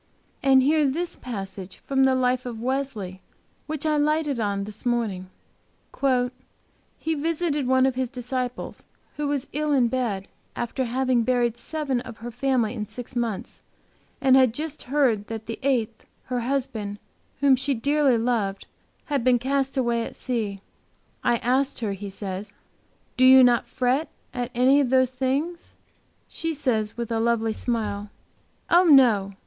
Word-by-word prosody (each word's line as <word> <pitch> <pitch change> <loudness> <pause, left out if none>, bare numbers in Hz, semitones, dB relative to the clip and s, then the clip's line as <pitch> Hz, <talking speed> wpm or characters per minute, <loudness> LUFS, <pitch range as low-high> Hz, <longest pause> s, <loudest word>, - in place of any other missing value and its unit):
And 265 -1 +5
hear 305 +3 +3
this 330 +6 -1
passage 195 -5 -7
from 270 -1 +3
the 265 -1 +3
life 255 0 +1
of 235 -2 -6
Wesley, 235 -7 -3 0.5
which 310 -1 -4
I 305 -1 +2
lighted 295 -2 +1
on 200 -2 -1
this 210 +1 -9
morning: 220 -7 -1 1.7
"He 320 - -2
visited 310 -2 -1
one 260 0 +4
of 265 - +2
his 255 -1 -2
disciples, 250 -1 -5 0.3
who 295 -1 -1
was 285 -2 -1
ill 300 +1 -1
in 255 -4 +3
bed 230 -7 -1
and - - -25 0.3
after 255 +2 -2
having 255 0 +1
buried 240 -1 +1
seven 275 0 -2
of 235 -3 -10
her 240 +2 -7
family 245 -2 0
in 215 -4 -4
six 245 +3 -8
months, 230 -4 -3 0.6
had 260 -3 +5
just 310 +1 -4
heard 255 -8 +2
that 220 -1 -6
the 230 - -6
eighth, 235 -5 -1 0.2
her 250 -1 -2
husband, 235 -5 -2 0.4
whom 275 -1 +5
she 265 +2 -1
dearly 280 +1 +2
loved, 225 -4 -1 0.4
had 280 -5 -1
been 250 0 +4
cast 270 +2 -1
away 235 -2 +1
at - - -7
sea. 215 -6 -3 0.6
'I 240 - +3
asked 255 +3 0
her,' 210 -3 -1
he 200 +1 -6
says, 195 +1 -6 0.6
'do 255 - +3
you 260 0 +9
not 245 -1 +4
fret 265 +5 0 0.2
at 245 -1 -3
any 260 +3 +5
of 275 -4 +1
those 260 -1 +3
things?' 275 +7 -2 0.5
She 330 -1 -3
says, 225 -7 -1
with 235 -1 -4
a 225 - +1
lovely 225 -1 +1
smile, 210 -4 -2 0.6
'Oh, 355 +2 +5
no! 235 - +5
250 Hz, 155 wpm, -25 LUFS, 225-275 Hz, 1.7 s, you